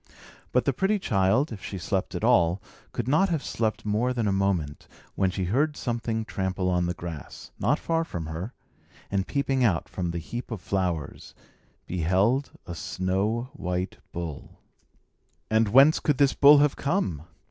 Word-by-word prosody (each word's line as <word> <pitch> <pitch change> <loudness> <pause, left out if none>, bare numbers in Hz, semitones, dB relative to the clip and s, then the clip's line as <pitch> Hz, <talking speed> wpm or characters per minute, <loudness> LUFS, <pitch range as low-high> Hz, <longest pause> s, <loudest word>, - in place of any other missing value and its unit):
But - - +2
the - - +2
pretty 200 +2 +1
child, 110 - +2
if 105 -4 -8
she 100 - -5
slept 95 +1 -2
at - - -4
all, 85 +3 +4 0.3
could 120 - -3
not 155 +8 +3
have 160 -5 -1
slept 110 -2 -2
more 110 +5 +1
than 115 -4 -1
a - - +2
moment, 95 -7 -1 0.3
when 95 -1 +1
she 95 +1 -3
heard 145 - +1
something 115 -2 -2
trample 95 -2 -1
on 90 -1 +1
the 90 - -2
grass, 85 -5 -8
not - - +2
far 165 0 0
from 85 - -5
her, 80 +8 -5 0.6
and 100 -1 0
peeping 135 -2 0
out 100 -8 +2
from 90 -2 -3
the 85 - -3
heap 120 +9 -6
of 115 -4 -4
flowers, 90 -4 -3 0.5
beheld 95 - +1 0.2
a 85 - -6
snow 95 +8 -1
white 90 -8 -3
bull. 85 -4 -6 0.9
And 110 0 +4
whence 135 +8 +6
could 145 -3 +1
this 140 -1 +4
bull 145 +1 +8
have 145 0 +3
come? 140 - -1
100 Hz, 170 wpm, -26 LUFS, 90-130 Hz, 0.9 s, bull